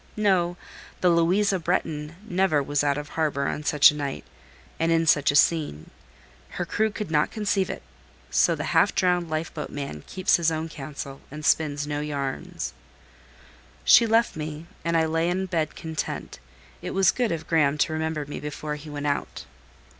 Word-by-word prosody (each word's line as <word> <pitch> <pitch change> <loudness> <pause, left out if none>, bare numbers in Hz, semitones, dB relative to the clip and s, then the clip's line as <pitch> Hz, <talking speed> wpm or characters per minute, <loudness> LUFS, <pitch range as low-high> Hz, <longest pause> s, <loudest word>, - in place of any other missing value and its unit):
No, 180 -4 +2 0.4
the 180 - +4
"Louisa 185 +4 +3
Bretton" 160 -2 -2
never 175 -6 +2
was 145 +1 0
out 140 -1 +1
of 145 0 -6
harbour 145 -3 -1
on - - -2
such 150 0 +6
a - - -8
night, 140 - -4 0.5
and 165 +1 +2
in 165 0 +3
such 145 -3 +4
a 145 - +2
scene: 145 - +2 0.7
her - - -1
crew 220 0 +1
could 210 -4 -6
not 150 -1 +2
conceive 205 -3 0
it; - - -6 0.5
so - - +3
the - - -4
half - - +4
drowned 180 -2 +2
life 155 +1 -3
boat 150 -2 -5
man 140 - -6
keeps 185 0 +2
his 165 -1 +2
own 160 +1 -3
counsel, 140 -2 -7
and 150 +2 -8
spins 150 -3 +2
no 145 0 -3
yarns. 140 -3 -4 1.1
She 230 - +7
left 230 +1 +2
me, 155 0 -6 0.2
and 170 0 +1
I 160 - +3
lay 165 +2 0
in 190 +2 -1
bed 165 -4 -2
content: 160 - -5 0.4
it - - -5
was 195 0 +5
good 245 -3 0
of 160 -1 -3
Graham 150 -3 +2
to 155 - +1
remember 155 -1 -2
me 145 - -6
before 150 0 -5
he 150 +1 -10
went 145 0 -5
out. 145 -1 -2
160 Hz, 180 wpm, -25 LUFS, 145-175 Hz, 1.1 s, She